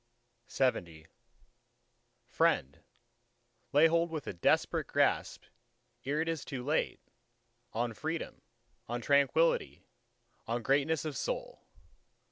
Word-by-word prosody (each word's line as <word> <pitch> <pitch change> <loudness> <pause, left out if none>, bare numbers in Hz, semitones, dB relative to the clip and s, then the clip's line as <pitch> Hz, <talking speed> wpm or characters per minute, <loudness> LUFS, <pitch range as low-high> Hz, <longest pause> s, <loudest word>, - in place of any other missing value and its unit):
LXXI 85 -12 -1 1.2
Friend, 125 - +1 0.9
lay 145 +3 +6
hold 170 +1 +3
with 155 -3 -5
a - - -4
desperate 85 - +1
grasp, - - +1 0.6
ere 145 +3 0
it 165 - -2
is 165 -4 -2
too 130 -3 -6
late, 150 +4 0 0.7
on 115 +1 -1
Freedom, 160 +8 -4 0.5
on 120 +1 -2
Tranquility, 140 - +2 0.6
on 115 +1 -2
Greatness 145 +5 +1
of 155 -3 -4
soul! - - -4
140 Hz, 100 wpm, -32 LUFS, 120-160 Hz, 1.2 s, lay